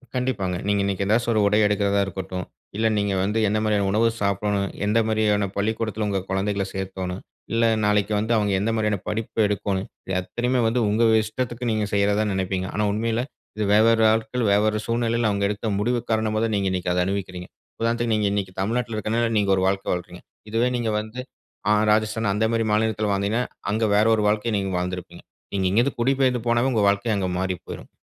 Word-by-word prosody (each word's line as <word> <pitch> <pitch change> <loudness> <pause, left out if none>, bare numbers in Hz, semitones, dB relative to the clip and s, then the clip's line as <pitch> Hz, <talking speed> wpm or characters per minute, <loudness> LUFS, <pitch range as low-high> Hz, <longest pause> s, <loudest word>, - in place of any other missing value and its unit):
கண்டிப்பாங்க. 105 -8 -1
நீங்க 100 -1 +2
இன்னைக்கு 100 0 -1
ஏதாச்சு 115 +4 +1
ஒரு 110 - +2
உடை 105 +1 +3
எடுக்கறதா 100 -1 +1
இருக்கட்டும், 95 -1 -5 0.3
இல்ல 110 +1 +2
நீங்க 100 -1 0
வந்து 105 +4 0
என்ன 105 +2 +1
மாரியான 105 -2 +1
உணவு 110 +3 +3
சாப்பிடணும், 100 0 0 0.2
எந்த 105 +2 +2
மாரியான 105 -2 +1
பள்ளிக்கூடத்துல 110 +1 -1
உங்க 100 -1 0
கொழந்தைகள 100 +1 0
சேக்கோணும், 95 -1 -4 0.3
இல்ல 115 0 +2 0.2
நாளைக்கு 105 0 +2
வந்து 110 +3 0
அவங்க 105 -1 +1
என்ன 105 +4 0
மாரியான 105 -1 +1
படிப்பு 110 +1 -3
எடுக்கோணும், 100 -1 -2 0.2
இது 95 - -4
அத்தனையுமே 125 +6 -1
வந்து 120 +2 +1
உங்க 110 +3 +2 0.2
இஷ்டத்துக்கு 120 +2 -3
நீங்க 110 -1 0
செய்யறதா 100 +1 +2
நெனப்பீங்க. 95 0 -2
ஆனா 105 +1 +1
உண்மையில 115 +2 0 0.3
இது 110 - 0
வெவ்வேறு 110 +2 +5
ஆட்கள், 110 +2 -1
வெவ்வேறு 105 +1 +2
சூழ்நிலையில 115 -1 +1
அவங்க 100 0 -1
எடுத்த 105 +2 -3
முடிவு 120 +3 +1
காரணமா 110 -1 +1
தான் 110 - -2
நீங்க 100 -1 0
இன்னிக்கு 90 -1 -1
அத 90 - +1
அனுபவிக்கிறீங்க. 90 -2 -4 0.3
உதாரணத்துக்கு 115 0 +1
நீங்க 105 -1 +1
இன்னிக்கு 100 -2 -2
தமிழ்நாட்ல 115 +2 -1
இருக்கதுனால 115 +2 0
நீங்க 100 -1 +1
ஒரு 95 - 0
வாழ்க்க 95 0 -1
வாழ்றீங்க. 90 0 -6 0.3
இதுவே 115 +3 +2
நீங்க 120 -2 -1
வந்து, 110 +3 -7 0.5
அ - - +6 0.2
ராஜஸ்தான் 110 0 +1
அந்த 110 +2 +1
மாரி 115 -1 +1
மாநிலத்துல 110 -1 +1
வாழ்ந்தீங்கன்னா, 100 +5 0 0.3
அங்க 110 +2 0
வேற 105 +1 +4
ஒரு 105 - 0
வாழ்க்கைய 105 +2 0
நீங்க 95 -1 -2
வாழ்ந்திருப்பீங்க. 90 0 -5 0.3
நீங்க 95 -1 +1
இங்க 100 +5 +2
இருந்து 140 +2 -1
குடிபெயர்ந்து 130 0 +2
போனாவே 120 +2 +2
உங்க 110 -3 +2
வாழ்க்கை 100 +3 0
அங்க 95 -2 -1
மாறி 95 0 -1
போயிரும். - - -9
105 Hz, 185 wpm, -23 LUFS, 100-115 Hz, 0.5 s, அ